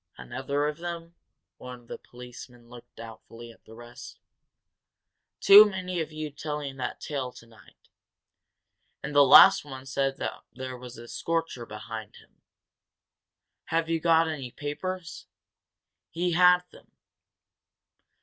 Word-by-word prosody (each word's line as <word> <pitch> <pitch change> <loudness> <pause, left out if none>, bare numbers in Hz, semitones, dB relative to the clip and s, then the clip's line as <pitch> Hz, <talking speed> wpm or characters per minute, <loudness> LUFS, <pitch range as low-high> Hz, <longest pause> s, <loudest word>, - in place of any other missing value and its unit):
"Another 135 - -3
of 150 +1 -5
them?" 170 -1 -7 0.4
One 125 -1 -10
of 120 - -24
the - - -8
policemen 125 -1 -13
looked 120 -1 -15
doubtfully 115 +1 -11
at - - -23
the 110 - -14
rest. 120 +1 -12 1.2
"Too 205 +2 +9
many 185 -2 -4
of 155 - -5
you 155 -1 -6
telling 145 -2 -6
that 125 -2 -5
tale 135 -5 -4
tonight. 115 -4 -19 1.2
And 150 - -5
the 145 - +6
last 135 - +8
one 135 -2 -10
said 135 0 -1 0.4
there 130 0 -7
was 125 -1 -11
a 120 +1 -11
scorcher 165 -6 -3
behind 110 0 -8
him. - - -21 1.2
Have 165 0 -1
you 165 - +1
got 165 0 +3
any 145 -6 -5
papers? 165 +6 -6 0.8
He 175 +2 -2
had 180 +1 +5
them!" - - -19
140 Hz, 130 wpm, -27 LUFS, 120-165 Hz, 1.2 s, Too